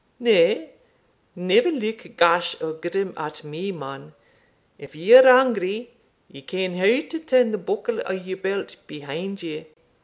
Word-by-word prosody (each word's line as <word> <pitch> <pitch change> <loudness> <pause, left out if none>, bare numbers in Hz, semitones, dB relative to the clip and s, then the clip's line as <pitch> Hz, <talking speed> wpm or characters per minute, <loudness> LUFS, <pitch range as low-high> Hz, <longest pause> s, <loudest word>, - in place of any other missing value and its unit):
Nay, 465 0 +3 0.6
never 185 - +2
look 230 -5 -5
gash 170 0 +2
or 160 -1 -4
grim 175 +4 -4
at 150 0 -7
me, 160 +7 -6
man 135 - -10 0.6
if 145 +1 -14
ye're 240 +11 +8
angry, 240 -3 +3 0.4
ye 140 - -15
ken 185 +5 -4
how 220 - +2
to 325 - -6
turn 255 -7 +2
the 215 - -3
buckle 455 +3 -3
o' - - -3
your 185 0 -6
belt 195 +1 -4
behind 170 +7 -7
you." 160 -1 -7
190 Hz, 145 wpm, -22 LUFS, 165-245 Hz, 0.6 s, ye're